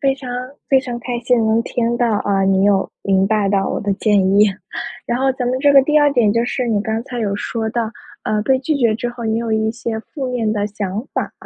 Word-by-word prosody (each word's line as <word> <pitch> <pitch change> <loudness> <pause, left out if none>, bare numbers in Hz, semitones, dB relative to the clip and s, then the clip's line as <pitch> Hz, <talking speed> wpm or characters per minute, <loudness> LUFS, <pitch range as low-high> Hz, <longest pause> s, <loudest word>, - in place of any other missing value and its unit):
非 275 -2 +2
常 260 -2 -9 0.4
非 270 - +5
常 245 -2 -5
开 245 0 -3
心 245 0 +2
能 225 +1 +2
听 235 0 -1
到， 235 -4 +1
啊， 195 -1 +1
你 190 0 +3
有 200 -1 +2
明 195 -1 +2
白 205 -1 +1
到 195 -1 +1
我 - - -2
的 205 -1 -2
建 205 -1 +2 0.2
议。 210 - +8 0.6
然 240 +1 -1
后 265 0 +2
咱 250 -1 -2
们 255 +1 0
这 285 -1 +5
个 275 - +8
第 300 +2 +3
2 290 -1 +4
点， 230 -5 +3
就 230 +1 +1
是 250 0 -2
你 215 -2 +1
刚 220 +1 -2
才 245 -3 -5
有 200 -2 -1
说 220 0 -3
到， 230 -1 -2 0.3
呃， 215 -1 0
被 260 +2 +2
拒 295 +3 -1
绝 235 -5 +2
之 240 +2 -3
后， 240 -1 -7
你 220 0 0
有 230 -1 -3
一 220 0 +1
些 230 -1 -4
负 260 +2 -6
面 230 -4 0
的 205 -1 -1
想 205 +3 -4
法。 - - -2
230 Hz, 260 characters per minute, -19 LUFS, 210-250 Hz, 0.6 s, 议